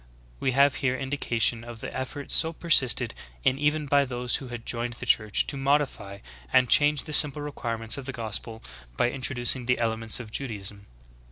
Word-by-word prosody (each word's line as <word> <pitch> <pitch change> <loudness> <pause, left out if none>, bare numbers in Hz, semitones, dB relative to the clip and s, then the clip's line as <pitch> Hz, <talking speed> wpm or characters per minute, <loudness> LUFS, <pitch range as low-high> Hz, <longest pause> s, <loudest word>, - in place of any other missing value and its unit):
We 130 - 0
have 140 +1 +3
here 130 -2 0
indication 120 -4 -1
of 120 -1 -9
the - - -7
effort 135 +2 -5
so 160 0 +3
persisted 155 - +2 0.3
in 130 - +1
even 150 +1 0
by 140 0 +3
those 125 -2 -1
who 135 - -9
had 120 -1 -8
joined 120 0 -1
the - - -8
Church, 110 -2 +3
to - - -4
modify 135 -8 -1 0.3
and 130 -1 +4
change 145 +2 +4
the 155 - -6
simple 150 -1 +5
requirements 115 -4 -1
of 135 - -9
the - - -3
gospel 110 -1 -5 0.3
by 120 - +1
introducing 125 -1 0
the 125 - +1
elements 115 -1 -1
of 110 -3 -9
Judaism. 105 -6 -5
125 Hz, 180 wpm, -26 LUFS, 115-140 Hz, 0.3 s, simple